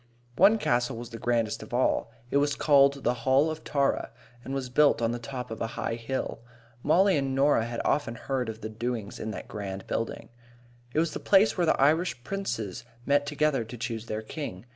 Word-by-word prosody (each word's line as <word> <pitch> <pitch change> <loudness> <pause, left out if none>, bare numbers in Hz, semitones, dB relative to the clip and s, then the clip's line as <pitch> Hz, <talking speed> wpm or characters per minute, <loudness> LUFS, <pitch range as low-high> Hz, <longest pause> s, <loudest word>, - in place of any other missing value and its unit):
One 215 - +6
castle 120 - 0
was 120 0 -8
the 115 - -7
grandest 115 -2 0
of - - -6
all. 125 -2 +1 0.2
It - - +3
was 145 0 +2
called 140 -2 +4
the 120 - +2
Hall 135 +6 +3
of 155 0 -7
Tara, 140 -1 0 0.3
and - - -7
was 135 -2 -3
built 150 +2 +4
on 115 -1 +1
the 120 - -3
top 125 0 -6
of 110 - -6
a 115 - 0
high - - -1
hill. 120 +3 -3 0.4
Mollie 185 +5 +4
and 135 -1 -1
Norah 135 -4 +3
had 120 0 -3
often 140 -5 +1
heard 125 -1 -2
of 110 0 -7
the 110 - -4
doings 115 -1 -4
in 110 - -4
that 110 - -6
grand 95 -2 -6
building. 115 - -3 0.6
It - - -5
was 165 -1 +1
the - - -4
place 205 +2 +4
where 175 -3 +1
the - - +3
Irish 150 -2 +2
princes 120 - -4 0.2
met 145 0 +2
together 150 -3 +1
to 115 +2 -9
choose 115 -1 -4
their 110 0 -3
king. 110 - -6
125 Hz, 205 wpm, -28 LUFS, 115-145 Hz, 0.6 s, One